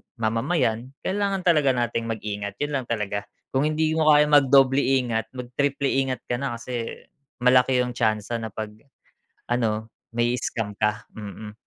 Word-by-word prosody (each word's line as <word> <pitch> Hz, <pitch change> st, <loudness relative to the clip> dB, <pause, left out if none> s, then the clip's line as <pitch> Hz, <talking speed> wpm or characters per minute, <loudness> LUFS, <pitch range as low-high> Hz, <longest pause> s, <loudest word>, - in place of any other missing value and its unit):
mamamayan, 115 Hz, +2 st, 0 dB
kailangan 195 Hz, -1 st, -1 dB
talaga 150 Hz, -7 st, +4 dB
natin 120 Hz, -1 st, -1 dB
mag-ingat 105 Hz, -2 st, -4 dB
'yun 145 Hz, 0 st, -3 dB
lang 125 Hz, -, -7 dB
talaga. 105 Hz, -3 st, -2 dB, 0.2 s
Kung 135 Hz, +3 st, +2 dB
hindi 155 Hz, 0 st, +1 dB
mo 155 Hz, -, +2 dB
kayang 150 Hz, 0 st, +4 dB
mag-doble 135 Hz, -1 st, +6 dB
ingat, 125 Hz, -5 st, +1 dB
mag 125 Hz, -1 st, -7 dB
triple 140 Hz, -1 st, +1 dB
ingat 130 Hz, -2 st, 0 dB
ka 120 Hz, -, -2 dB
na 135 Hz, -3 st, -2 dB
kasi, 115 Hz, 0 st, -5 dB, 0.3 s
malaki 125 Hz, +1 st, +4 dB
'yung 125 Hz, 0 st, 0 dB
tsansa 110 Hz, 0 st, 0 dB
na 110 Hz, -, -4 dB
pag 105 Hz, +1 st, -6 dB, 0.8 s
ano 110 Hz, -2 st, -1 dB, 0.2 s
mai-scam 120 Hz, -3 st, -1 dB
ka, 105 Hz, 0 st, 0 dB
mm. 105 Hz, 0 st, -8 dB
120 Hz, 150 wpm, -24 LUFS, 110-135 Hz, 0.8 s, mag-doble